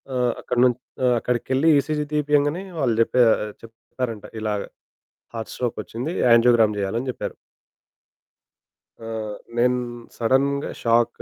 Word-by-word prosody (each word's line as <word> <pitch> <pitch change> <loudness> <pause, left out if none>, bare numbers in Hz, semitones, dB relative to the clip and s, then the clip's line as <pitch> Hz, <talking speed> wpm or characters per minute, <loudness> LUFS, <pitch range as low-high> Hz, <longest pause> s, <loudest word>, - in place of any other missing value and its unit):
ఆహ్, 125 -2 +1
అక్కడి 120 -1 0
నుంచి 125 0 +1 0.2
ఆహ్, 125 -1 +4
అక్కడికెళ్లి 130 +6 +1
ఈసీజీ 150 +1 -1
తీపియంగనే 150 +3 +1 0.2
వాళ్ళు 125 -6 +1
చెప్పా 125 +2 +4 0.4
చెప్పారంట 115 0 -6 0.2
ఇలా 110 -1 -1 0.8
హార్ట్ 115 -1 -5
స్ట్రోక్ 120 -2 -3
ఒచ్చింది, 125 +8 -5 0.2
యాంజియోగ్రామ్ 115 -2 +5
జేయాలని 115 +7 -2
చెప్పారు. - - -5 1.7
ఆ! 115 - -10 0.5
నేను 125 +1 +3 0.4
సడెన్‌గా 135 +4 +1
షాక్ 120 0 +2
125 Hz, 110 wpm, -23 LUFS, 115-135 Hz, 1.7 s, యాంజియోగ్రామ్